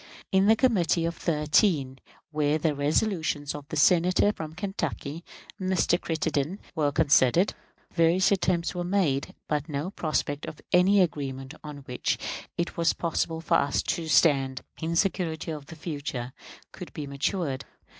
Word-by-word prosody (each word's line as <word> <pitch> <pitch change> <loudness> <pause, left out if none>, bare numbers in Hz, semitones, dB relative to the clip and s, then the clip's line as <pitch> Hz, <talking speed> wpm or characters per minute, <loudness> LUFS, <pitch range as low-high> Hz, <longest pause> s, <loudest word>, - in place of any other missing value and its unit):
In 190 0 +4
the 220 - +7
Committee 185 -9 +2
of 170 0 -2
Thirteen, 150 -3 +1 0.3
where 150 0 +1
the 155 -1 +1
resolutions 150 0 0
of 145 -1 -8
the 155 - -4
Senator 180 +6 +4
from 160 -3 -7
Kentucky 170 -4 -4 0.4
[Mr. 185 -2 +1
Crittenden] 160 +1 -1 0.2
were 150 -2 +1
considered, 145 - +4 0.4
various 170 +3 +3
attempts 175 -3 +1
were 175 - -3
made, 175 -7 0
but 150 +1 -1
no 150 +5 -3
prospect 150 -5 -2
of 155 - -8
any 190 +3 +5
agreement 135 -4 -2
on 145 -2 -8
which 125 -3 -1 0.4
it 170 - -2
was 170 0 +3
possible 165 -1 -2
for 165 - +3
us 140 - +1
to 165 -1 -2
stand, 135 -5 +3 0.2
in 165 +1 -1
security 165 -3 0
for 155 - -4
the 160 +4 -11
future, 145 -6 -5 0.4
could - - -9
be 150 - -5
matured. 140 0 -2
160 Hz, 145 wpm, -27 LUFS, 145-180 Hz, 0.4 s, the